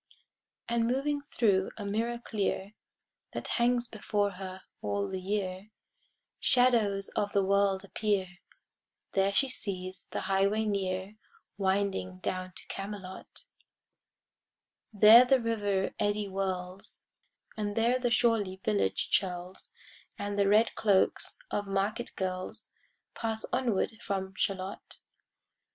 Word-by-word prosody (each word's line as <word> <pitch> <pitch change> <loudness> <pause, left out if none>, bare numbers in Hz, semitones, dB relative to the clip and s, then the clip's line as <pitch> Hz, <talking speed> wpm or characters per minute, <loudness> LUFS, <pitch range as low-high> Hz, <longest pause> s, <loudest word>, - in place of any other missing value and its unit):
And 235 -1 +1
moving 285 +4 0
thro' 200 -8 +1
a 205 - -5
mirror 225 +4 -1
clear 205 -3 -2 0.6
That - - -4
hangs 240 0 +3
before 205 -2 -1
her 185 0 -8 0.2
all 100 -1 -1
the 190 - -4
year,[Pg 190 0 -2 0.7
69] 250 0 +5
Shadows 200 -2 -2
of 205 0 -2
the 200 -1 +3
world 200 0 +2
appear, 195 -3 -1 0.7
There 195 0 +2
she 270 +7 +3
sees 185 -6 -3
the - - -2
highway 200 +3 +2
near 195 0 -2 0.4
Winding 190 - 0
down 185 - -3
to - - -10
Camelot: 195 -2 -6 1.5
There 215 +3 +9
the 260 +1 +4
river 205 -4 0
eddy 205 0 +1
whirls, 190 -1 -4 0.5
And 205 -1 -3
there 240 +3 +3
the 245 -1 +1
surly 225 -5 +2
village 100 -2 +1
churls, 180 -1 -1 0.5
And 205 0 -3
the 200 - +4
red 215 +3 +4
cloaks 200 -3 +2
of 205 -1 -1
market 200 +5 -1
girls, 185 -1 -4 0.4
Pass 225 -1 -2
onward 235 -7 +1
from 190 -1 -3
Shalott. 190 +1 -3
200 Hz, 120 wpm, -30 LUFS, 190-220 Hz, 1.5 s, There